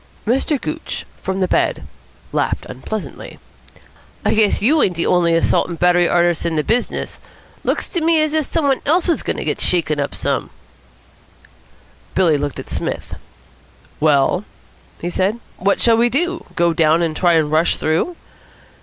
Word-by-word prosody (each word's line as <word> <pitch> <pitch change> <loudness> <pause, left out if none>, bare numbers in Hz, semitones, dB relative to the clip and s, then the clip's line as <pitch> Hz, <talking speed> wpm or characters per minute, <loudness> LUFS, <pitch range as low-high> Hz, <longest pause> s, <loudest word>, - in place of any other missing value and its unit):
Mr. 265 +5 +1
Gooch, 155 - -5 0.2
from 190 0 -2
the 185 - +2
bed, - - 0 0.5
laughed - - -1
unpleasantly. 205 +11 -7 0.9
"I - - +3
guess 215 -2 +3
you 295 +8 +3
ain't 180 - +1
the 170 - -1
only 170 -2 +3
assault 165 - +2
and 170 - -5
battery 175 0 +3
artists 175 -1 +2
in 170 -1 -1
the 150 - +1
business," 235 +7 -1
he - - -28 0.4
said. - - -30
"Looks - - -1
to 345 - -2
me 325 0 +3
as 310 0 +1
if 310 -2 +1
some 325 +1 -1
one 270 -2 +2
else 335 +5 +3
was 335 - +1
going - - -3
to - - -3
get - - -2
shaken 155 -4 +2
up 140 - -2
some." - - -2 1.7
Billy 175 -5 +4
looked 145 -1 -3
at - - -9
Psmith. - - -4 0.9
"Well?" 150 +4 +3 0.6
he 175 - -4
said. 195 +6 0 0.2
"What 200 +2 +1
shall 230 -1 +4
we 240 +1 +3
do? 345 +7 -1
Go 170 -1 +2
down 160 +1 +3
and 160 -2 -1
try 175 0 +3
and 155 -2 +2
rush 160 +2 +3
through?" 165 - -1
180 Hz, 175 wpm, -19 LUFS, 165-250 Hz, 1.7 s, Billy